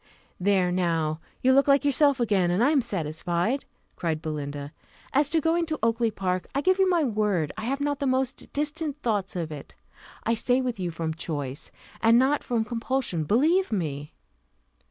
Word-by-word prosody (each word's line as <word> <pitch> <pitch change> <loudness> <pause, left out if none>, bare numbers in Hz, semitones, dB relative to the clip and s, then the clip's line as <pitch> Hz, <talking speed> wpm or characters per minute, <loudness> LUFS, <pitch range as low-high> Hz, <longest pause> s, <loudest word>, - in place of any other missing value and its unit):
"There 185 -1 +2
now, 165 -3 0 0.2
you 260 +1 +5
look 275 +2 +4
like 280 +1 +4
yourself 285 -1 +3
again, 200 -7 +2
and 180 +6 +2
I 280 - +4
am 290 -4 +3
satisfied," 175 - -2 0.3
cried 165 -3 -2
Belinda. 145 -2 -5 0.4
"As 285 +1 +3
to 325 - +2
going 330 +2 +1
to 310 -1 -2
Oakly 230 0 +2
park, 185 -3 -2
I 280 - +2
give 370 +4 +2
you 380 -1 +4
my 345 -3 +3
word 210 - 0
I 220 +1 -5
have 275 +3 -1
not 285 0 -1
the 280 - -1
most 260 0 -1
distant 295 0 -2
thoughts 205 -3 -1
of 165 -3 -3
it. 145 -2 -9 0.5
I 230 - +1
stay 245 +3 +1
with 250 -5 -2
you 180 -2 -2
from 165 -1 -3
choice, 145 -4 -5 0.3
and 225 +1 +5
not 270 +4 +2
from 230 -2 0
compulsion, 235 -8 -1
believe 310 - +2
me." 150 -7 -3
225 Hz, 180 wpm, -26 LUFS, 170-275 Hz, 0.5 s, you